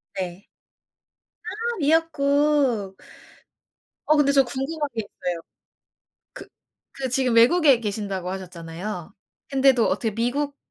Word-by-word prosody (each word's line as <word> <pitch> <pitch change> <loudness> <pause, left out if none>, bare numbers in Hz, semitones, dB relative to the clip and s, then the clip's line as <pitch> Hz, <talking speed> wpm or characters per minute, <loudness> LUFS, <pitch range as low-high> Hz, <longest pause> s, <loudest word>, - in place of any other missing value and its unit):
네. 185 0 -5 1.1
아 465 +1 -3
미역국. 285 - +2 1.1
어 305 - +6
근데 290 -2 +4
저 275 -1 +5
궁금한 285 +5 -3
게 225 - 0
있어요. 180 -4 -5 0.9
그 - - -11 0.5
그 270 -1 -3
지금 255 -1 +1
외국에 270 +2 +5
계신다고 200 -4 -3
하셨잖아요. 180 0 -7 0.4
근데도 265 -3 +4
어떻게 220 -3 -1
미국 280 +5 -1
250 Hz, 225 characters per minute, -24 LUFS, 200-285 Hz, 1.1 s, 어